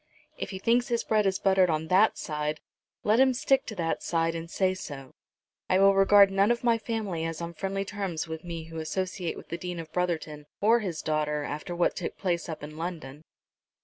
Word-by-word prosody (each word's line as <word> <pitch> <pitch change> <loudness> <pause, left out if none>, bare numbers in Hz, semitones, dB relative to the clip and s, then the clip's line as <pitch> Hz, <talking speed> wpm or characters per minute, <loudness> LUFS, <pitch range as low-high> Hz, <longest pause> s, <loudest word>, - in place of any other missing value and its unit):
"If - - -5
he 190 - -5
thinks 235 +6 +2
his 235 -2 0
bread 215 -2 +2
is 190 -1 +1
buttered 190 -2 +3
on 160 0 -1
that 195 +4 +4
side, 150 0 -3 0.4
let 215 +3 +3
him 260 -1 +5
stick 270 +2 +2
to 220 - -5
that 165 -3 -1
side 165 -1 0
and 165 0 -6
say 185 +1 +1
so. 140 -8 -8 0.6
I 185 - +4
will 195 +1 +6
regard 195 0 +6
none 195 +2 +3
of 240 0 +1
my 230 -1 +3
family 215 -8 -3
as 165 -1 -3
on 170 0 -5
friendly 195 +4 -3
terms 195 -5 -3
with 160 0 -6
me 170 -2 -5
who 165 0 -8
associate 180 +2 -3
with - - -12
the 170 - -4
Dean 180 -1 -5
of 160 -1 -9
Brotherton 160 -4 -2
or 225 +3 +4
his 180 -8 -4
daughter 150 -1 0
after 150 +5 -5
what 175 - +1
took - - -5
place 175 -3 -1
up 160 -2 -6
in 150 +1 -8
London." 160 -4 -6
180 Hz, 215 wpm, -28 LUFS, 160-200 Hz, 0.6 s, will